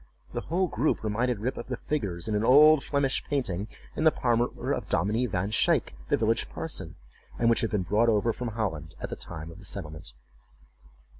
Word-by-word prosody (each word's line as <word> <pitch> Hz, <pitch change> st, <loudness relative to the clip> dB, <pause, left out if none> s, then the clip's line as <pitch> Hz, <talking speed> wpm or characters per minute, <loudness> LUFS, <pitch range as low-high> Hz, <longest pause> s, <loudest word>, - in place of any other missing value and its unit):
The -, -, -2 dB
whole 180 Hz, +4 st, 0 dB
group 130 Hz, 0 st, 0 dB
reminded 115 Hz, +1 st, 0 dB
Rip 125 Hz, +4 st, -2 dB
of -, -, -6 dB
the 125 Hz, -2 st, -3 dB
figures 100 Hz, -, -3 dB
in 110 Hz, -, -1 dB
an 105 Hz, +1 st, +1 dB
old 150 Hz, +4 st, +7 dB
Flemish 140 Hz, -2 st, 0 dB
painting, 105 Hz, -9 st, -2 dB, 0.3 s
in -, -, -1 dB
the 160 Hz, -, +8 dB
parlor 120 Hz, -2 st, 0 dB
of -, -, -4 dB
Dominie 105 Hz, +9 st, +1 dB
Van 95 Hz, 0 st, -1 dB
Shaick, 110 Hz, -, +2 dB
the -, -, +2 dB
village -, -, +1 dB
parson, -, -, -5 dB, 0.4 s
and 115 Hz, 0 st, +3 dB
which 115 Hz, -, +2 dB
had 115 Hz, -, 0 dB
been 105 Hz, -3 st, 0 dB
brought 105 Hz, +6 st, +3 dB
over 110 Hz, +1 st, +2 dB
from 125 Hz, -, -4 dB
Holland 95 Hz, -9 st, -3 dB
at -, -, -5 dB
the -, -, -2 dB
time 80 Hz, -1 st, -8 dB
of 85 Hz, -, -12 dB
the 100 Hz, -, -13 dB
settlement. 75 Hz, -11 st, -7 dB
110 Hz, 200 wpm, -28 LUFS, 95-125 Hz, 0.4 s, the